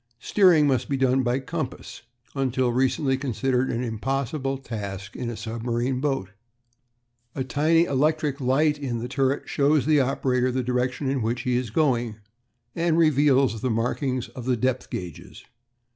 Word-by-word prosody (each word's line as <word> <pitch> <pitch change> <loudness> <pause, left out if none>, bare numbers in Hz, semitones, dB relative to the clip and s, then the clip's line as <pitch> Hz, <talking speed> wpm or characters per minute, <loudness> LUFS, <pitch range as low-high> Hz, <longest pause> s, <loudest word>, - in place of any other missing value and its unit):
Steering 175 - +4
must 135 -3 +1
be 140 - 0
done 130 0 +2
by 120 0 +1
compass; 135 0 -5 0.3
until 130 -2 0
recently 135 +2 +1
considered 130 0 0
an 120 +1 -2
impossible 135 +4 -2
task 100 -6 -7
in 120 - -4
a 115 - -5
submarine 120 +3 -2
boat. 135 -10 -1 1.0
A 130 - -1
tiny 155 +5 +3
electric 150 -1 0
light 145 +4 +2
in 130 -5 -3
the 115 +1 -4
turret 135 +1 0
shows 145 0 +2
the 155 -1 +4
operator 130 -1 0
the 130 0 -1
direction 125 +2 -1
in 135 -1 0
which 115 +2 -1
he 125 -1 0
is 125 -2 -1
going, 120 -4 +1 0.6
and 165 -1 +1
reveals 140 -7 +3
the 130 - 0
markings 125 +3 -1
on 125 - -9
the 125 -1 +1
depth 130 +2 -1
gauges. 90 -4 -8
130 Hz, 155 wpm, -25 LUFS, 120-140 Hz, 1.0 s, Steering